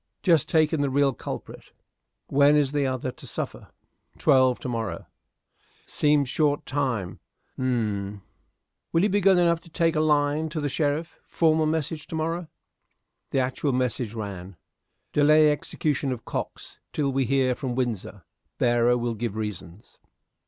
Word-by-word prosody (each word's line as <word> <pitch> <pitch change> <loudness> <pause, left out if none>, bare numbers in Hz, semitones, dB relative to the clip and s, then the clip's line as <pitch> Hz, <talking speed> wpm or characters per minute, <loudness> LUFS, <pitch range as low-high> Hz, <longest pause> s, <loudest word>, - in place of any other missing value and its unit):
"Just 165 -6 +3
taken 155 -2 +2
the 140 - +1
real 140 0 +2
culprit." - - -7 0.6
"When 145 +1 +4
is 145 -2 +2
the 145 -2 +1
other 130 0 -2
to - - -13
suffer?" - - -5 0.5
"Twelve 130 -2 +4
to - - -5
morrow." 115 -8 -3 0.8
"Seems 145 -2 +2
short 145 +1 +1
time. 120 -10 -2 0.4
Humph! 105 -6 -2 0.7
Will 165 - +2
you 210 - +3
be 205 +1 +1
good 195 -1 +5
enough 170 -1 +3
to 170 - -18
take 165 0 +1
a - - +2
line 150 0 +2
to 155 +1 -4
the 145 - -1
sheriff? 155 +3 -1
Formal 160 -1 +2
message 155 0 -2
to - - -6
morrow." 165 +2 -2 0.8
The 135 - +1
actual 130 +2 -1
message 125 -3 -1
ran: 100 -4 -6 0.6
"Delay 150 +1 +5
execution 145 -1 -1
of 125 -3 -5
Cox - - -6
till 140 -2 0
we 135 0 +1
hear 130 0 +2
from 125 -1 -4
Windsor. 120 -6 -3 0.3
Bearer 120 0 +3
will 120 -1 -2
give 110 -1 -4
reasons." 105 -3 -7
140 Hz, 150 wpm, -25 LUFS, 120-155 Hz, 0.8 s, good